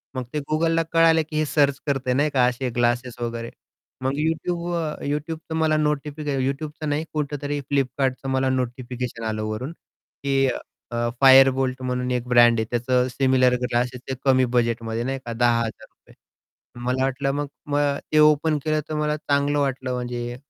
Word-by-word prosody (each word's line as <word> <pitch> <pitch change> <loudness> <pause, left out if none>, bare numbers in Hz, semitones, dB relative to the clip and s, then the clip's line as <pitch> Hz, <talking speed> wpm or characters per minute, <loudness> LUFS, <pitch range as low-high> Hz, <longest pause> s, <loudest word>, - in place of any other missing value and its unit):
मग 130 - -2
ते 150 - 0
Googleला 165 +1 +2
कळालं 165 -1 +5
की 155 - -3
हे 155 - +2
सर्च 140 -2 +2
करतंय 135 -3 0
नाही 145 +4 +2
का? 130 -3 +3
असे 125 +1 -1
ग्लासेस 120 +1 -1
वगैरे 115 0 -4 0.5
मग 130 +1 0 0.2
Youtube 170 +2 -2
अ, 160 -3 -3
Youtubeचं 155 +3 -4
मला 160 -1 +2
नोटिफिकेशन 150 -1 -1
Youtubeचं 150 +2 -4
नाही 150 +2 -1
कुठेतरी 145 -1 -2
फ्लिपकार्टचं 135 -1 -1
मला 130 0 +1
नोटिफिकेशन 125 -2 -3
आलं 110 -1 -2
वरून 110 +8 -4 0.5
की 135 -1 +2 0.4
अ, 120 0 -1
फायर 135 0 +8
बोल्ट 130 0 -2
म्हणून 125 0 -2
एक 125 -1 -2
ब्रँड 120 -1 +5
आहे 110 - 0
त्याचं 125 +1 +1
सिमिलर 130 -1 +3
ग्लासेस 125 0 -1
ते - - -1
कमी 130 -1 +4
बजेटमध्ये 115 -1 0
नाही 135 +2 -2
का? 120 - -4
₹10,000 115 -1 -2 0.7
मला 130 +1 0
वाटलं 135 +1 -1 0.3
मग 145 -1 -1 0.4
ते 155 - +4
ओपन 150 +1 +4
केलं 155 -1 +1
तर 155 - -3
मला 150 0 0
चांगलं 145 -1 0
वाटलं 135 -2 -1
म्हणजे 120 -1 -4
135 Hz, 160 wpm, -23 LUFS, 125-150 Hz, 0.7 s, फायर